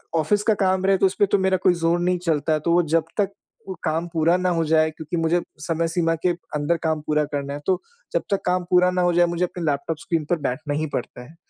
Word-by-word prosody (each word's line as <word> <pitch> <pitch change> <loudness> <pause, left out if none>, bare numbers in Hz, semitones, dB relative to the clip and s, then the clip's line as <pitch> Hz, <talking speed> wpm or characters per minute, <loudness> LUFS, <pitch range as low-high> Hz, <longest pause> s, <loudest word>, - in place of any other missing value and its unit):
Office 200 +6 +1
का 220 - +3
काम 190 0 +1
रहे 195 0 +4
तो 195 - +3
उसपे 190 +2 +2
तो 200 - +2
मेरा 190 0 +2
कोई 180 - +5
ज़ोर 170 0 +1
नहीं 180 +1 +1
चलता, 155 -1 +1
तो 160 +3 -1
वो 175 0 +4
जब 160 0 +1
तक 200 -2 +1 0.4
वो 190 - -5
काम 160 +2 -1
पूरा 165 +1 +3
ना 185 0 0
हो 165 -2 +1
जाए, 155 0 +3
क्योंकि 160 +2 -5
मुझे 165 +2 +1 0.2
समय 165 +1 -1
सीमा 165 0 0
के - - +5 0.3
अंदर 150 +3 +1
काम 160 -1 0
पूरा 150 0 +2
करना 140 -1 -3
है, 145 - -5
तो 185 -1 +1 0.3
जब - - +1
तक 200 - +1
काम 180 0 +1
पूरा 180 0 +4
ना 180 0 0
हो 175 0 +2
जाए 175 0 +4
मुझे 170 +1 -1
अपने 175 0 -7
लैपटॉप 150 +2 -1
स्क्रीन 165 -2 -2
पर 175 - +2
बैठना 145 +4 -3
ही 155 +2 -1
पड़ता 125 - -4
है। 160 - -17
170 Hz, 255 wpm, -23 LUFS, 155-180 Hz, 0.4 s, कोई